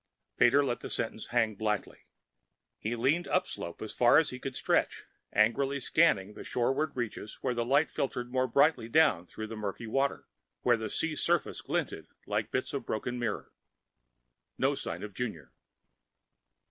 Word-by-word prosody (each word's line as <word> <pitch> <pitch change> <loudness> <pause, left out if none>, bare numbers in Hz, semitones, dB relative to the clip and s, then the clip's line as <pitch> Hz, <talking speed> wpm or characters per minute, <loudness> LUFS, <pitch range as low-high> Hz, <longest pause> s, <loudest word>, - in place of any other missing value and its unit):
Pater 140 +4 +5
let 120 -2 -1
the - - -7
sentence 110 -1 -3
hang 115 -3 +1
blackly. 105 0 -3 0.7
He 115 +3 -2
leaned 140 +9 +1
upslope 85 - -2
as 110 - -4
far 120 +2 +5
as 160 - +3
he 125 - -7
could 130 0 -5
stretch, - - +1 0.3
angrily 135 +6 +2
scanning 120 - +3
the - - -9
shoreward 135 +5 0
reaches 115 -3 -4
where 125 - 0
light 130 +6 +2
filtered 125 -2 -3
more 130 0 +1
brightly 140 -2 +3
down 130 - +4
through 110 - -6
the 110 +1 -7
murky 105 +1 -4
water, 135 +5 0 0.4
where 120 - +5
the 110 -1 -4
sea 160 +6 -1
surface - - 0
glinted - - -2 0.2
like - - -1
bits - - -2
of - - -2
broken 120 +3 -3
mirror. 115 -3 -3 1.1
No - - +2
sign - - -4
of 105 -1 -7
Junior. 85 - -5
120 Hz, 160 wpm, -30 LUFS, 110-135 Hz, 1.1 s, Pater